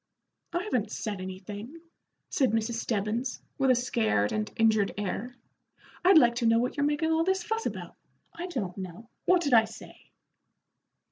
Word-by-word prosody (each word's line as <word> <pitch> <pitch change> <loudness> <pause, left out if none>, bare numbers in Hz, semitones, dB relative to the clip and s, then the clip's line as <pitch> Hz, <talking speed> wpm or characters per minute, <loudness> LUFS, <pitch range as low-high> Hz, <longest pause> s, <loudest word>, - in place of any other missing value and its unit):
"I 345 +2 -1
haven't 245 - -1
said 205 -4 -4
anything," 205 - -7 0.5
said 260 -6 +2
Mrs. 225 +1 0
Stebbins, 225 +2 -2 0.2
with 270 -1 +3
a 255 - +6
scared 220 - +1
and 215 -1 -2
injured 220 -3 +3
air. 205 +5 -3 0.7
"I'd 365 -1 +7
like 240 -6 +6
to 235 -1 +2
know 225 0 +5
what 245 +2 0
you're 285 0 +2
making 300 +2 0
all 320 0 +3
this 380 +1 +1
fuss 445 +3 -1
about? - - -6 0.4
I 340 +2 -5
don't 205 - -4
know. 190 +5 -8 0.2
What 360 -1 +4
did 285 -4 0
I 225 -1 +7
say?" - - -13
235 Hz, 165 wpm, -28 LUFS, 210-300 Hz, 0.7 s, I'd